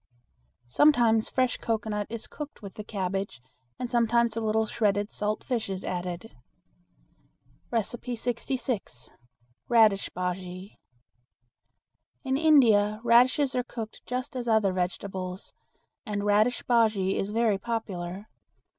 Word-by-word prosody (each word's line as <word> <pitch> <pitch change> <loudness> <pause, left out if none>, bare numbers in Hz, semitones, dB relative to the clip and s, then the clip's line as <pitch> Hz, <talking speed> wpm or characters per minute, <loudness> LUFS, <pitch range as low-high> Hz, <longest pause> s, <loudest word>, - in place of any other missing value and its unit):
Sometimes 230 - +4
fresh 255 -1 +1
cocoanut 215 -2 -2
is 230 0 -5
cooked 295 -6 -8
with 195 - -8
the 210 - -7
cabbage 195 -6 -3 0.4
and 250 - -3
sometimes 235 -1 +2
a 230 - -2
little 220 0 +1
shredded 205 -1 0
salt 210 +1 -2
fish 235 -6 -2
is 190 0 -4
added. 180 +4 -5 1.4
66. 240 - -3 0.6
Radish 220 -4 +4
Bujea. 180 +1 -5 1.5
In 265 -1 0
India 230 -9 +4
radishes 255 +4 +4
are 250 - +1
cooked 230 -3 -8
just 250 +1 -4
as 245 -1 -4
other 215 -4 +3
vegetables, 185 0 -4 0.5
and 210 -4 -3
radish 215 +4 +2
bujea 215 -5 +2
is 195 - -1
very 220 -2 +1
popular. 195 -4 -4
220 Hz, 110 wpm, -27 LUFS, 195-240 Hz, 1.5 s, Sometimes